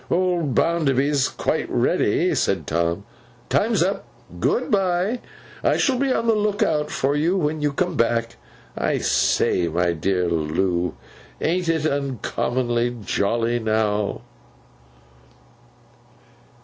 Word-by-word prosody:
'Old 175 -5 +1
Bounderby's 140 -4 +2
quite - - -2
ready,' - - +1
said 95 -6 0
Tom. 85 +2 -1 0.4
'Time's - - +2
up. - - -2 0.3
Good 245 - 0
bye! 195 +3 +1 0.4
I - - +3
shall 260 -3 +1
be 275 -1 +1
on 230 - 0
the 230 - +4
look 210 0 +1
out 150 -6 0
for 140 +2 0
you, 165 +6 +1
when 155 -3 -1
you 145 -1 +1
come 175 +4 -1
back. 115 - 0 0.4
I - - 0
say, 85 - +2
my 85 +2 +1
dear 90 +2 0
Loo! 85 +2 0 0.4
AN'T 175 +1 0
it 160 -2 +1
uncommonly 125 -3 -1
jolly 115 +4 0
now! 110 -2 0
135 Hz, 120 wpm, -22 LUFS, -, 0.4 s, the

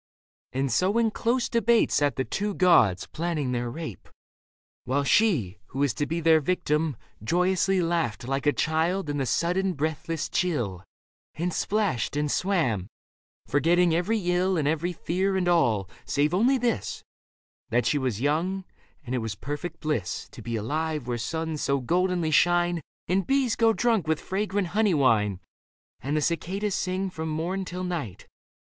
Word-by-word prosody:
And 135 0 -1
so 185 - +2
in 230 -2 +3
close 240 +3 0
debate 235 0 +3
Sat 145 -1 +2
the 130 - -1
two 205 - -2
gods, 125 - +4
planning 160 -5 -2
their 120 -1 -1
rape; 120 - -7 0.7
while 135 +3 0
she. 135 - +2
Who - - -10
was 140 -4 +2
to 145 - -2
be 165 +2 -2
their 160 -1 +5
victim, 150 -3 0 0.3
joyously 180 - +2
Laughed 165 -9 -1
like 135 +2 -1
a - - +6
child 160 +3 0
in 145 - -2
the 135 -2 -1
sudden 180 +7 +1
breathless 155 +1 -2
chill 120 - -1 0.5
And 175 +1 -2
splashed 200 - 0
and 145 0 0
swam, 140 - 0 0.6
forgetting 170 +4 +3
every 180 +7 +1
ill 180 +1 +2
And 150 -3 +1
every 160 +3 0
fear 190 +3 -1
and 180 -1 0
all, 115 - +2 0.2
save 150 +3 0
only 240 +9 +3
this: 240 -2 -2 0.7
That 120 +2 +1
she 150 - +2
was 125 -6 -1
young, 170 +8 0 0.4
and 125 - -4
it 130 - +1
was 110 -2 -4
perfect 150 - -6
bliss 145 - -2
To - - -11
be 115 0 -4
alive 150 +6 -2
where 120 -1 -2
suns 160 +6 -3
so 140 0 +1
goldenly 175 +4 0
shine, 175 +1 +3 0.3
And 185 +2 +1
bees 270 -4 +2
go 225 -1 +4
drunk 225 -6 +1
with 160 -1 +1
fragrant 200 -1 -2
honey 210 -2 +2
wine. 105 -9 +2 0.6
And 145 +3 -2
the - - +1
cicadas 190 +6 -1
sing 185 +1 -1
from 160 -2 -4
morn 175 +5 -2
till 180 0 -5
night. 160 - -4
165 Hz, 165 wpm, -26 LUFS, 140-185 Hz, 0.7 s, a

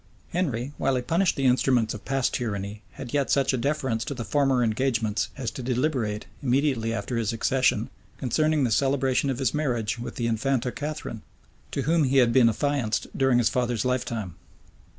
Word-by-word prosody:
Henry, 140 -7 -2
while 135 - +1
he 125 - -1
punished 170 +6 +2
the 135 - -1
instruments 125 -3 +3
of 105 - -8
past 135 -1 0
tyranny, 105 -3 -3
had 120 - -8
yet 140 -2 +1
such 140 -1 +2
a - - +1
deference 130 -4 -1
to 140 - -4
former 130 +3 +2
engagements 115 -2 0
as 125 -5 -3
to 130 - -7
deliberate, 125 -4 -1 0.2
immediately 130 -3 +1
after 115 +2 -3
his 115 -1 0
accession, 130 +3 +1 0.3
concerning 155 +3 +1
the 120 - +1
celebration 135 +2 +2
of 130 - -1
his 135 -1 0
marriage 120 -7 -1
with 120 0 -6
the 120 - -2
infanta 125 +2 0
Catharine, 150 -7 -5 0.5
to 140 - -2
whom 160 +2 +3
he 135 +1 +2
had 120 -3 +5
been 125 -3 +6
affianced 125 -2 -1
during 135 -2 +3
his 120 -2 +3
father's 120 -3 0
lifetime. 120 -7 -2
125 Hz, 175 wpm, -26 LUFS, 115-140 Hz, 0.5 s, been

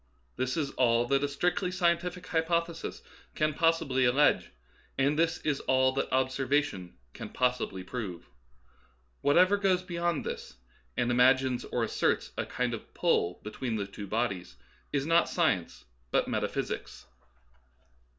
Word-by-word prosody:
This 130 +4 -1
is 145 -4 -1
all 120 -2 +2
that 140 0 +2
a - - +2
strictly 175 +6 0
scientific 180 0 0
hypothesis 170 0 -1 0.3
can 155 0 +1
possibly 160 -5 +2
allege, 135 +4 +3 0.5
and 140 +2 +2
this 165 +1 +2
is 145 -3 0
all 130 0 +3
that 135 +1 -2
observation 130 -6 0 0.2
can - - -7
possibly 125 -7 -1
prove. 95 -4 -6 0.9
Whatever 185 +7 +5
goes 190 -2 +2
beyond 170 -2 -2
this, - - -6 0.4
and 120 - +1
imagines 130 +1 +3
or 120 - -1
as 110 - -2
serts - - 0
a - - -3
kind - - -1
of - - -7
"pull" 85 +1 +1
between 110 +2 -4
the 100 -2 -2
two 100 +1 -8
bodies, 100 - -2 0.4
is 140 -1 0
not 165 +2 +3
science, 100 - 0 0.2
but - - +1
metaphysics. - - -3
135 Hz, 140 wpm, -29 LUFS, 120-165 Hz, 0.9 s, Whatever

